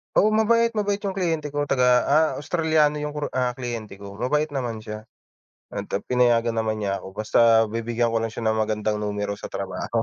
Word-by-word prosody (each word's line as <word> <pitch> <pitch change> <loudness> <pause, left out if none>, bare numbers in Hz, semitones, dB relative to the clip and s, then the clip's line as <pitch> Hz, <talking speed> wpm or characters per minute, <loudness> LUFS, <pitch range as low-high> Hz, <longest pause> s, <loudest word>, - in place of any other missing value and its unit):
Oo 210 - +5
mabait, 230 +1 +3
mabait 205 -1 0
yung 195 -1 -2
kliyente 165 -5 -1
ko 145 0 -1
taga, 125 -2 +2 0.2
ah, 155 +2 +4
Australiano 155 -1 +2
yung 150 - -3
kuru, 150 -1 -2
ah, 125 -1 +1
kliyente 120 -5 -5
ko. 100 0 -9
Mabait 150 +7 0
naman 120 -4 -3
siya 110 0 -8 0.7
at, - - -4
ah, - - -1
pinayagan 120 -2 +2
naman 110 -1 0
niya 100 -1 -2
ako, - - -9
basta 110 0 0 0.3
bibigyan 115 0 -1
ko 115 - +2
lang 115 0 -2
siya 115 - -6
ng 110 0 +2
magandang 105 0 -1
numero 105 -1 -2
sa - - -7
trabaho. 115 +3 -3
120 Hz, 200 wpm, -24 LUFS, 110-150 Hz, 0.7 s, Oo